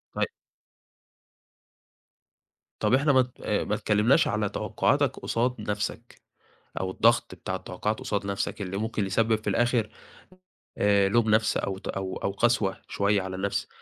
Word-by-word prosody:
طيب. - - +2 2.6
طَب - - +2
احنا 140 +3 +4
ما 130 - +6
ت 125 -1 -7
آآ، - - 0
ما - - -1
اتكلّمناش 105 +9 +3
على 105 -2 0
توقّعاتك - - 0
قصاد 120 +2 0
نَفْسك 105 0 -4 0.6
أو 95 0 -2
الضغط 115 -1 +2
بتاع 95 +1 -4
التوقّعات 95 +3 -3
قصاد 100 -1 -2
نَفْسك، 100 +1 -3
اللي 95 0 -3
ممكن 110 -1 -1
يسبّب 110 +4 +2
في - - -1
الآخِر 120 -3 +1 0.9
آآ، 100 -1 +4
لوم 110 +2 +2
نَفْس 110 +1 +3
أو 95 -1 -2
ت - - -8
أو 95 -1 -4
أو - - -2
قسوة 105 -1 +1
شوية 100 0 +1
على 95 0 -5
النَفْس، 100 +1 -2
105 Hz, 150 wpm, -27 LUFS, 100-115 Hz, 2.6 s, ما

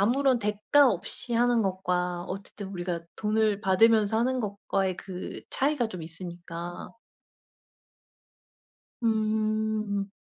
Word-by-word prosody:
아무런 255 +4 +3
대가 210 +7 +4
없이 200 +6 -4
하는 240 -1 +3
것과 180 -2 -1
어쨌든 195 +1 -7
우리가 175 -2 -3 0.2
돈을 215 -1 +1
받으면서 220 +2 +4
하는 255 +2 +1
것과의 195 -3 -1
그 185 -1 -7
차이가 275 -3 +1
좀 180 -5 -7
있으니까. 170 +1 -7 2.1
음. 215 -2 0
205 Hz, 225 characters per minute, -28 LUFS, 185-225 Hz, 2.1 s, 대가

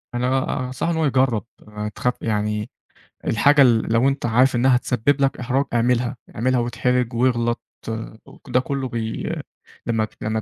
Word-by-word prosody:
أنا 125 +1 0 0.4
آآ - - -3
أنصحُه 130 +6 -2
إن - - -1
هو 160 - +2
يجرّب، 130 -5 +2 0.5
تخ 125 - +1
يعني 105 -1 -1 0.6
الحاجة 140 +6 +4
ال 115 -3 +4
لو 115 +3 +4
أنت 135 -1 -1
عارف 125 +3 +3
إنّها 125 +1 +4
هتسبّب 125 +3 +1
لك 135 0 +2
إحراج 130 +3 0
اعملها، 120 +1 +1 0.2
اعملها 125 +3 +1
وإتحرج 125 +1 0
وأغلّط 120 -1 +1 0.9
ده 125 - +2
كُلّه 135 0 -3
بي 115 -1 -3 0.5
لمّا 110 -2 0
لمّا 110 0 -1
125 Hz, 150 wpm, -22 LUFS, 115-130 Hz, 0.9 s, الحاجة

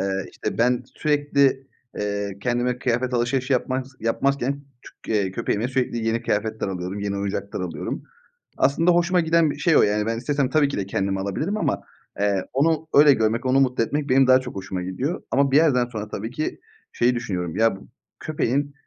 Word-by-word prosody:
Eee, 95 0 -2
işte, - - -5
ben 125 +1 +2
sürekli, 140 -3 +1 0.3
eee, 100 -1 -3
kendime 125 +1 0
kıyafet 125 0 -1
alışverişi 125 +3 0
yapmaz 130 +1 -1
yapmazken 140 +4 0 0.2
çü - - -8
eee, 100 -3 +1
köpeğime 110 +5 -1
sürekli 125 -3 -1
yeni 115 +1 0
kıyafetler 110 -2 -1
alıyorum. 95 +2 -4
Yeni 100 0 -2
oyuncaklar 100 0 -3
alıyorum. 90 -2 -4 0.6
Aslında 165 +6 +3
hoşuma 175 +1 +3
giden 165 -1 +3
bir - - -7
şey 165 -3 +3
o, - - +6
yani, 105 +1 +2
ben 115 0 -1
istesem 140 +2 0
tabii 155 -2 +3
ki 140 - -4
de 100 - -2
kendimi 95 0 -1
alabilirim 125 - -2
ama, - - -1 0.4
eee, 100 -2 +1
onu 160 +3 +1
öyle 145 0 +8
görmek, 110 +1 0
onu 130 +1 +3
mutlu 125 -3 +2
etmek 145 +5 -2
benim 130 0 +5
daha 130 0 +7
çok 125 -4 -8
hoşuma 95 -1 -4
gidiyor. 125 - -3
Ama 140 0 +2
bir 140 - +5
yerden 140 -6 +4
sonra 110 -3 -6
tabii 110 +4 -5
ki 155 +4 -3 0.3
şeyi 125 +1 +2
düşünüyorum. 90 -9 -3
Ya, 115 -2 +3
bu - - -16 0.3
köpeğin, 145 -1 -1
125 Hz, 185 wpm, -23 LUFS, 105-140 Hz, 0.6 s, öyle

